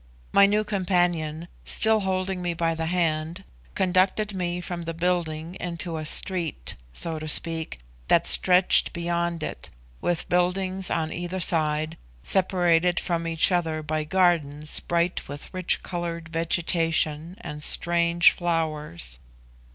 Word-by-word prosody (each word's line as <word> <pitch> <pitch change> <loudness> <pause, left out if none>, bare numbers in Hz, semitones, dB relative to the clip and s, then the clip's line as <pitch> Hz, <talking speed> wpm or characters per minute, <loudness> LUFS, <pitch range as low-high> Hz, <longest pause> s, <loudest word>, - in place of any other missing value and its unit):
My 200 0 +6
new 210 +1 +1
companion, 175 -5 -1 0.2
still 220 0 +4
holding 190 -1 -2
me 175 -1 -2
by 165 0 0
the 160 0 -3
hand, 165 +1 -1 0.3
conducted 190 +3 +1
me 180 -2 -2
from 175 -1 -6
the 165 0 -5
building 170 -2 -2
into 170 -1 -4
a 155 -1 -3
street 165 - 0 0.2
(so 160 - -3
to 155 - -6
speak) 160 - 0 0.3
that 170 0 +3
stretched 180 0 +4
beyond 170 -1 -2
it, - - -5 0.3
with 175 -2 -1
buildings 185 +1 0
on 160 -1 -2
either 175 +2 -4
side, 155 -2 +1 0.3
separated 175 - +3
from 170 -1 -2
each 165 +3 +2
other 160 -3 -1
by 155 0 -2
gardens 155 -4 +2
bright 170 +1 -1
with 145 +5 -8
rich 185 -1 0
coloured 170 -2 -5
vegetation 165 0 0
and 150 0 -7
strange 170 +1 +3
flowers. 155 - -3
170 Hz, 130 wpm, -25 LUFS, 160-180 Hz, 0.3 s, My